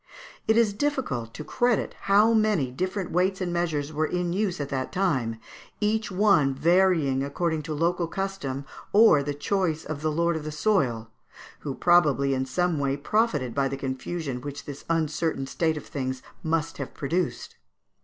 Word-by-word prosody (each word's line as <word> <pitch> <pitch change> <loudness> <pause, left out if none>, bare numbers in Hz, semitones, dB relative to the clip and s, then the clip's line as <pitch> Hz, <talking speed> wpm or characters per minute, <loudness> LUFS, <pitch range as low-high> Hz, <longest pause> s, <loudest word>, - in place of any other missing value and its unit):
It 220 +1 +4
is 225 -3 +4
difficult 205 - -2
to 155 - -6
credit 240 +6 +1 0.2
how 210 +3 +6
many 210 - +2
different 185 +6 -3
weights 185 +2 +1
and 180 -2 -2
measures 155 -4 -1
were 155 +1 0
in 180 -1 -1
use 190 -3 -1
at 140 -1 -3
that 130 -1 -3
time, 135 -13 0 0.4
each 215 +1 0
one 180 -9 +3
varying 165 -3 +3
according 160 +3 -1
to 155 - -2
local 170 +2 +1
custom 165 -8 -4 0.3
or 205 -8 +7
the 145 0 -3
choice 165 0 -1
of 150 -1 -5
the 155 0 0
lord 170 +2 +1
of 160 - -4
the 155 - -4
soil, 135 - 0 0.5
who 140 -2 -5
probably 150 -6 +3
in 130 0 -1
some 175 +4 0
way 140 0 0
profited 150 - 0
by 140 -1 +1
the 135 - -4
confusion 135 +1 -4
which 145 +1 -7
this 145 -1 -8
uncertain 160 -3 0
state 160 +3 0
of - - -7
things 130 -2 -4 0.2
must 160 -1 -1
have 140 - -6
produced. 170 +5 -2
160 Hz, 170 wpm, -26 LUFS, 140-185 Hz, 0.5 s, or